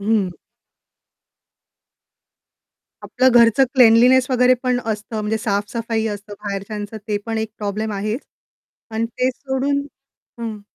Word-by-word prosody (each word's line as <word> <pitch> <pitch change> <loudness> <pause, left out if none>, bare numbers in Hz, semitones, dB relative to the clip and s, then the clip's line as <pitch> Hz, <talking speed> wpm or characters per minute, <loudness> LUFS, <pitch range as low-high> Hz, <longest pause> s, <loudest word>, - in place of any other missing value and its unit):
हं. 205 -2 +1 2.7
आपलं 260 +1 +2
घरचं 235 +3 +5
क्लिनलीनेस 250 +1 +6
वगैरे 250 0 +4
पण 250 -1 +1
असतं 215 0 -3
म्हणजे 210 +1 -1
साफ-सफाई 220 +2 -2
असते, 205 +1 -11
बाहेरच्यांचं 205 +1 -5
ते 210 - +1
पण 225 -1 -2
एक 220 0 -3
प्रॉब्लेम 210 +1 -3
आहेच 210 +6 -2 0.7
आणि 225 +1 0
तेच 255 0 +1
सोडून 275 +1 -1 0.6
हं. 220 -2 -5
220 Hz, 110 wpm, -20 LUFS, 210-250 Hz, 2.7 s, क्लिनलीनेस